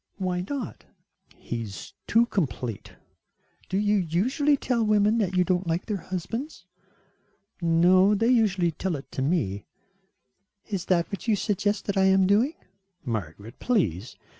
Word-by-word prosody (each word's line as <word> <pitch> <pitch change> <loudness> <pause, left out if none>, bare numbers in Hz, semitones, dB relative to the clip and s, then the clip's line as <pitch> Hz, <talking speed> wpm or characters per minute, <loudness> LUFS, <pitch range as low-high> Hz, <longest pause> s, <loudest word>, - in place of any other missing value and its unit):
"Why 180 -2 -2
not?" 275 -8 -5 0.5
"He 120 -1 -5
is 100 -5 -8
too 230 +2 +4
complete." 130 - -3 0.8
"Do 190 - 0
you 205 +1 +2
usually 240 - +1
tell 245 -3 0
women 215 +1 +3
that 190 -4 0
you 180 - +5
don't 180 0 0
like 165 +3 -1
their 210 -3 -2
husbands?" 205 - -5 1.0
"No, 180 +4 +4
they 225 +4 +1
usually 200 -8 +3
tell 175 +2 -3
it 140 - -9
to - - -4
me." 125 - -1 1.0
"Is 195 -5 -4
that 175 0 +1
what 200 - -6
you 220 - +4
suggest 205 +1 -1
that 200 -1 -2
I 190 - +4
am 190 0 +4
doing?" 225 - +2 0.5
"Margaret, 105 - -5
please. 125 - 0
190 Hz, 145 wpm, -26 LUFS, 165-210 Hz, 1.0 s, you